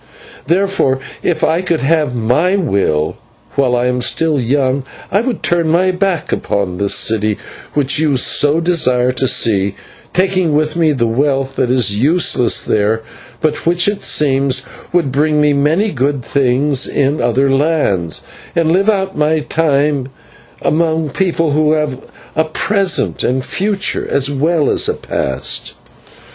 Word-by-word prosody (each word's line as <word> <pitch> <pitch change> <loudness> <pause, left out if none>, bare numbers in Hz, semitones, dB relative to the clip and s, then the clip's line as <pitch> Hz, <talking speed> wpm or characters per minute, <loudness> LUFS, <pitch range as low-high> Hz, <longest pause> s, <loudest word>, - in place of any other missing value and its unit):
Therefore, 180 -6 +1 0.2
if 175 - -1
I 165 +3 +2
could 175 -3 -1
have 150 -2 +1
my 125 - +1
will, 100 - 0 0.4
while 130 -3 +1
I 120 0 0
am 125 0 0
still 155 +3 +1
young 130 +2 0 0.3
I 200 - +2
would 240 -3 -3
turn 170 -2 +1
my 180 +3 +2
back 180 -3 -1
upon 95 -3 -2
this 100 0 +1
city 110 -2 +1 0.4
which 145 -1 +2
you 150 -4 +1
so 145 +5 +3
desire 130 -8 +2
to 130 +1 0
see, 100 -4 +1 0.4
taking 185 -4 +1
with 155 +1 0
me 165 -2 +2
the 130 -5 0
wealth 135 +3 0
that 125 - +1
is 115 -5 +1
useless 145 -3 +2
there, 110 +2 0 0.4
but 155 0 -1
which, 175 +1 +3
it 205 0 -1
seems, 135 -3 +1 0.3
would 170 -6 +1
bring 150 +3 +1
me 150 -1 +3
many 160 +9 +1
good 135 -1 -1
things 140 +1 +1
in 140 +2 0
other 130 +3 +1
lands, 135 - 0 0.3
and 165 -1 +2
live 195 +5 +2
out 195 -2 0
my 150 +1 +1
time 145 -3 0 0.6
among 160 -1 0
people 165 -2 0
who 155 +1 +2
have 150 -4 -3 0.3
a 160 - +2
present 195 +4 0
and 130 +2 0
a - - -8
future 200 0 -1
as 140 0 +1
well 150 +2 +1
as - - 0
a - - -1
past." 65 -1 -2
145 Hz, 155 wpm, -15 LUFS, 130-165 Hz, 0.6 s, so